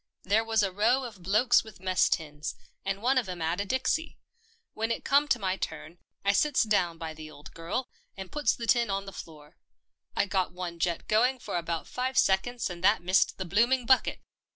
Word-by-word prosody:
There 210 Hz, +4 st, +2 dB
was 225 Hz, -1 st, +1 dB
a 195 Hz, -, 0 dB
row 230 Hz, +7 st, +2 dB
of 220 Hz, -7 st, -9 dB
blokes 215 Hz, +7 st, +3 dB
with 220 Hz, -4 st, -13 dB
mess 185 Hz, -1 st, +2 dB
tins, 150 Hz, -2 st, -3 dB, 0.3 s
and 195 Hz, +2 st, -3 dB
one 260 Hz, +2 st, +4 dB
of 225 Hz, -7 st, -4 dB
'em 180 Hz, -1 st, -5 dB
'ad 165 Hz, +4 st, -1 dB
a -, -, -3 dB
dixie. 260 Hz, +8 st, -1 dB, 0.6 s
When 225 Hz, +1 st, -2 dB
it 230 Hz, -, -3 dB
come 285 Hz, +2 st, +4 dB
to 270 Hz, -, +2 dB
my 190 Hz, -3 st, -1 dB
turn, 170 Hz, -1 st, -6 dB, 0.3 s
I 200 Hz, -, +5 dB
sits 290 Hz, +5 st, +3 dB
down 180 Hz, -6 st, +1 dB
by 165 Hz, -1 st, -6 dB
the 155 Hz, 0 st, -10 dB
old 150 Hz, 0 st, -13 dB
girl, 175 Hz, +10 st, -3 dB, 0.3 s
and 190 Hz, -1 st, -8 dB
puts 295 Hz, -6 st, +1 dB
the 235 Hz, -, -5 dB
tin 235 Hz, -1 st, +3 dB
on 195 Hz, 0 st, -2 dB
the 195 Hz, -, -9 dB
floor. 150 Hz, -4 st, -11 dB, 0.6 s
I -, -, +2 dB
got 190 Hz, -2 st, -1 dB
one 175 Hz, -2 st, -6 dB
jet 170 Hz, 0 st, -1 dB
going 245 Hz, +5 st, +3 dB
for 245 Hz, -, -6 dB
about 170 Hz, -1 st, -2 dB
five 255 Hz, +1 st, -3 dB
seconds 235 Hz, +6 st, +2 dB
and 175 Hz, -1 st, -8 dB
that 205 Hz, -1 st, +4 dB
missed 185 Hz, +2 st, +2 dB
the 190 Hz, -, -4 dB
blooming 235 Hz, +8 st, +2 dB
bucket. 260 Hz, +2 st, +2 dB
195 Hz, 210 wpm, -28 LUFS, 175-240 Hz, 0.6 s, I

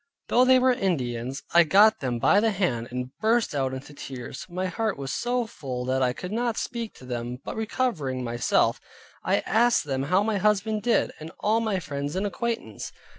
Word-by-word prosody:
Though 250 Hz, +1 st, +5 dB
they 260 Hz, 0 st, +6 dB
were 255 Hz, 0 st, +4 dB
Indians, 130 Hz, -, -2 dB
I 170 Hz, 0 st, +8 dB
got 205 Hz, +7 st, +5 dB
them 125 Hz, -3 st, -2 dB
by 200 Hz, -, +4 dB
the 225 Hz, +1 st, +3 dB
hand, 175 Hz, -, -1 dB
and 125 Hz, +1 st, -5 dB
burst 225 Hz, -2 st, +2 dB
out 135 Hz, -2 st, 0 dB
into 130 Hz, +2 st, -8 dB
tears. 130 Hz, -2 st, -8 dB
My 180 Hz, +2 st, -3 dB
heart 215 Hz, +2 st, -1 dB
was 135 Hz, -1 st, -4 dB
so 245 Hz, 0 st, 0 dB
full 130 Hz, -, -5 dB
that 130 Hz, +1 st, 0 dB
I 125 Hz, -1 st, +3 dB
could 180 Hz, +9 st, -7 dB
not 235 Hz, +1 st, -1 dB
speak 235 Hz, -3 st, -4 dB
to 130 Hz, -, -13 dB
them; 120 Hz, 0 st, -4 dB
but -, -, -5 dB
recovering 195 Hz, -, -1 dB
myself, 120 Hz, 0 st, +1 dB, 0.4 s
I -, -, +2 dB
asked 240 Hz, +3 st, +3 dB
them 135 Hz, -2 st, -2 dB
how 185 Hz, +6 st, +3 dB
my 215 Hz, -2 st, 0 dB
husband 210 Hz, +1 st, +1 dB
did, 235 Hz, +1 st, +2 dB
and 160 Hz, +1 st, -8 dB
all 220 Hz, +2 st, +2 dB
my 215 Hz, -4 st, 0 dB
friends 145 Hz, -2 st, -4 dB
and 190 Hz, +2 st, 0 dB
acquaintance? 230 Hz, +3 st, -3 dB
185 Hz, 195 wpm, -26 LUFS, 130-220 Hz, 0.4 s, I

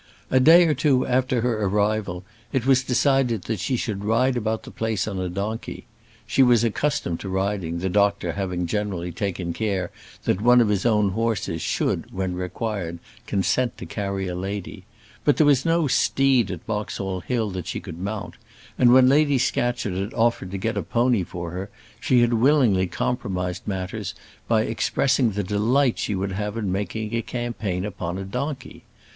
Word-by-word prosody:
A 130 Hz, -, +5 dB
day 165 Hz, +6 st, +7 dB
or 155 Hz, -, +3 dB
two 135 Hz, -2 st, +2 dB
after 130 Hz, -1 st, +1 dB
her 115 Hz, -3 st, 0 dB
arrival 100 Hz, -2 st, 0 dB, 0.3 s
it 130 Hz, -4 st, -1 dB
was 130 Hz, -1 st, +4 dB
decided 130 Hz, -, +2 dB
that 110 Hz, +1 st, -3 dB
she 105 Hz, +7 st, -1 dB
should 105 Hz, -4 st, -3 dB
ride 120 Hz, +5 st, +2 dB
about 110 Hz, -1 st, -1 dB
the -, -, -10 dB
place 110 Hz, -4 st, -2 dB
on 100 Hz, -3 st, -3 dB
a 90 Hz, -1 st, -2 dB
donkey; 100 Hz, +5 st, -4 dB, 0.4 s
she -, -, +2 dB
was 120 Hz, -3 st, +5 dB
accustomed 115 Hz, -, -1 dB
to 95 Hz, -, -6 dB
riding, 95 Hz, -3 st, -1 dB
the 90 Hz, +2 st, -2 dB
doctor 100 Hz, +1 st, +1 dB
having 90 Hz, -3 st, -2 dB
generally 90 Hz, -2 st, -2 dB
taken 90 Hz, -2 st, -3 dB
care 95 Hz, -4 st, -2 dB, 0.3 s
that 90 Hz, -, 0 dB
one 125 Hz, +2 st, +6 dB
of 115 Hz, -3 st, +3 dB
his 105 Hz, +2 st, +1 dB
own 105 Hz, -3 st, +3 dB
horses 100 Hz, -6 st, -1 dB
should, -, -, -1 dB
when 95 Hz, -1 st, -2 dB
required, 90 Hz, -1 st, -4 dB, 0.3 s
consent 115 Hz, +5 st, 0 dB
to -, -, -7 dB
carry 100 Hz, -2 st, -3 dB
a 90 Hz, -, -3 dB
lady; 95 Hz, +1 st, -5 dB, 0.4 s
but 145 Hz, -4 st, +3 dB
there 155 Hz, -, +5 dB
was 140 Hz, -3 st, +4 dB
no 165 Hz, 0 st, +2 dB
steed 135 Hz, -3 st, +2 dB
at 90 Hz, -4 st, -6 dB
Boxall 100 Hz, -3 st, -3 dB
Hill 110 Hz, 0 st, -2 dB
that 90 Hz, -2 st, -5 dB
she -, -, -3 dB
could 80 Hz, -, -9 dB
mount; 100 Hz, +2 st, -5 dB, 0.4 s
and 125 Hz, -1 st, +6 dB
when 130 Hz, 0 st, +7 dB
Lady 145 Hz, +1 st, +4 dB
Scatcherd 120 Hz, -4 st, 0 dB
had 95 Hz, +4 st, -4 dB
offered 115 Hz, -5 st, +1 dB
to 100 Hz, -, -4 dB
get 115 Hz, +4 st, -2 dB
a -, -, +1 dB
pony 120 Hz, -3 st, +1 dB
for 85 Hz, -1 st, -6 dB
her, 95 Hz, +3 st, -5 dB, 0.3 s
she 125 Hz, -2 st, +3 dB
had 120 Hz, 0 st, +3 dB
willingly 115 Hz, -6 st, +3 dB
compromised 90 Hz, -4 st, -3 dB
matters 95 Hz, 0 st, -4 dB, 0.3 s
by -, -, +3 dB
expressing 135 Hz, -3 st, +1 dB
the 100 Hz, +1 st, -1 dB
delight 115 Hz, +7 st, +1 dB
she 105 Hz, -, -1 dB
would 95 Hz, +1 st, -2 dB
have 105 Hz, +3 st, -3 dB
in 105 Hz, -5 st, -2 dB
making 105 Hz, +3 st, -3 dB
a 115 Hz, -, +1 dB
campaign 115 Hz, -7 st, -3 dB
on 90 Hz, +1 st, -3 dB
a 95 Hz, -, -4 dB
donkey. 130 Hz, +7 st, -5 dB
105 Hz, 180 wpm, -24 LUFS, 95-125 Hz, 0.4 s, day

